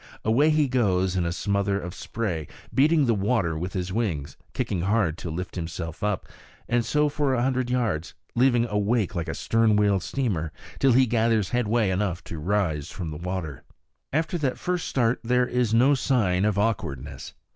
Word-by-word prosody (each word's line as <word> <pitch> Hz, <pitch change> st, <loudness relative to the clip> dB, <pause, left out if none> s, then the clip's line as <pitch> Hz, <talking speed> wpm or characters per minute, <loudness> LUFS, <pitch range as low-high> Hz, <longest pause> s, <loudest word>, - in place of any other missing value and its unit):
Away 125 Hz, +8 st, +4 dB
he 155 Hz, -2 st, +3 dB
goes 95 Hz, -7 st, +1 dB
in 90 Hz, -2 st, +1 dB
a 85 Hz, -, 0 dB
smother 100 Hz, +2 st, 0 dB
of 90 Hz, -2 st, -6 dB
spray, 95 Hz, -, -3 dB, 0.3 s
beating 150 Hz, +2 st, +4 dB
the 120 Hz, -, +3 dB
water 100 Hz, -5 st, +1 dB
with 90 Hz, +4 st, -4 dB
his 90 Hz, 0 st, -3 dB
wings, 90 Hz, -11 st, -2 dB, 0.2 s
kicking 90 Hz, -, -2 dB
hard 95 Hz, -3 st, +1 dB
to 85 Hz, -, -5 dB
lift 90 Hz, +3 st, -5 dB
himself 80 Hz, -1 st, -5 dB
up; 105 Hz, -2 st, -1 dB, 0.4 s
and 120 Hz, 0 st, +2 dB
so 150 Hz, +6 st, +2 dB
for 145 Hz, -2 st, 0 dB
a 120 Hz, -, +1 dB
hundred 130 Hz, -1 st, 0 dB
yards, 110 Hz, -11 st, -1 dB, 0.2 s
leaving 120 Hz, -1 st, +3 dB
a 105 Hz, -3 st, -1 dB
wake 105 Hz, 0 st, +1 dB
like 85 Hz, -3 st, -3 dB
a -, -, -3 dB
stern 115 Hz, -1 st, +2 dB
wheel 100 Hz, -2 st, +3 dB
steamer, 95 Hz, -, -2 dB, 0.3 s
till 135 Hz, -2 st, +4 dB
he 130 Hz, +2 st, +5 dB
gathers 115 Hz, -3 st, +1 dB
headway 115 Hz, -4 st, +1 dB
enough 90 Hz, -2 st, -1 dB
to 80 Hz, -, -7 dB
rise 80 Hz, -4 st, 0 dB
from 85 Hz, -4 st, -5 dB
the 75 Hz, -, -6 dB
water. 85 Hz, -4 st, -4 dB, 0.5 s
After 160 Hz, +4 st, 0 dB
that 135 Hz, -4 st, -1 dB
first 180 Hz, -1 st, -2 dB
start 125 Hz, -1 st, +1 dB
there 125 Hz, +1 st, +2 dB
is 125 Hz, -2 st, 0 dB
no 125 Hz, +5 st, +5 dB
sign 105 Hz, -9 st, +1 dB
of 105 Hz, -2 st, +1 dB
awkwardness. 70 Hz, -, -2 dB
105 Hz, 185 wpm, -25 LUFS, 90-125 Hz, 0.5 s, he